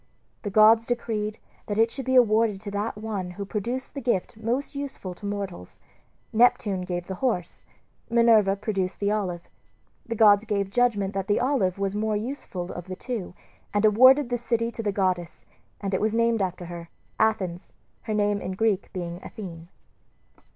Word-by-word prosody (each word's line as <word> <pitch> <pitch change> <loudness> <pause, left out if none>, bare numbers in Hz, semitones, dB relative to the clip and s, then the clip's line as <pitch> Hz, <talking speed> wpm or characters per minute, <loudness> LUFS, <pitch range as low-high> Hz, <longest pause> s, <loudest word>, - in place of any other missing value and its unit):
The 205 - -3
gods 220 +3 +6
decreed 220 -3 -2 0.3
that 205 - -2
it 225 +1 +4
should 270 0 -6
be 260 - +2
awarded 220 -4 +4
to 205 -1 -6
that 205 +2 -2
one 210 -4 -4
who 200 - -4
produced 235 +6 -4
the 275 - -5
gift 230 -7 -1
most 235 +7 -2
useful 275 -10 -5
to 200 +3 -8
mortals. 200 - -5 0.5
Neptune 215 -4 +3
gave 175 -1 -4
the 190 - -5
horse; 220 -10 -2 0.4
Minerva 225 -4 +5
produced 195 -3 -2
the 200 0 +1
olive. 185 -5 -2 0.6
The 230 - -2
gods 205 -1 +6
gave 200 -3 -1
judgment 205 -5 +1
that 195 -1 -3
the 205 - +2
olive 245 -9 +1
was 195 0 -1
the 205 - -2
more 215 -1 0
useful 210 -6 -5
of 175 +1 -7
the 185 - -5
two, 220 -5 -5 0.4
and 205 +1 +3
awarded 255 +5 +6
the 245 - 0
city 230 0 0
to 230 - -5
the 210 -2 0
goddess; 185 -3 -1 0.3
and 195 -1 -3
it 190 - +1
was 215 +1 +1
named 230 -1 +2
after 180 -1 -2
her, 170 -1 -8 0.3
Athens, 185 -5 0 0.3
her 220 - -2
name 205 -1 +1
in 185 - -4
Greek 205 -1 0
being 175 -2 -5
Athene. 170 -5 -9
210 Hz, 180 wpm, -26 LUFS, 190-230 Hz, 0.6 s, gods